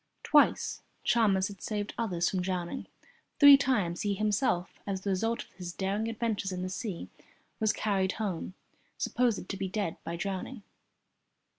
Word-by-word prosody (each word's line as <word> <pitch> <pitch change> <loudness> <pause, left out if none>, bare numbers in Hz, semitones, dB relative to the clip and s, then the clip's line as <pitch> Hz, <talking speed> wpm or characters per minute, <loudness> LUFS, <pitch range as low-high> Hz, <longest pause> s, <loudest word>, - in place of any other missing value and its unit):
Twice - - +3 0.2
Chalmers 200 -5 +3
had 200 -2 -11
saved 210 -1 -3
others 180 -7 0
from 185 - 0
drowning. 180 -2 -3 0.5
Three 285 -1 +11
times 210 -11 +1
he 205 -1 0
himself, 210 -3 0
as 195 -2 -2
the 200 - -1
result 225 +5 0
of - - -24
his 175 -2 -7
daring 200 +4 -1
adventures 220 -3 -2
in 180 0 -3
the 185 - -3
sea, 190 -1 -4 0.5
was 215 -2 +3
carried 195 -3 0
home, 190 -4 -3 0.4
supposed 235 -6 0
to 195 - -4
be 195 - -2
dead 195 -4 -2
by 170 - -4
drowning. 195 +6 -4
200 Hz, 155 wpm, -30 LUFS, 185-220 Hz, 0.5 s, Three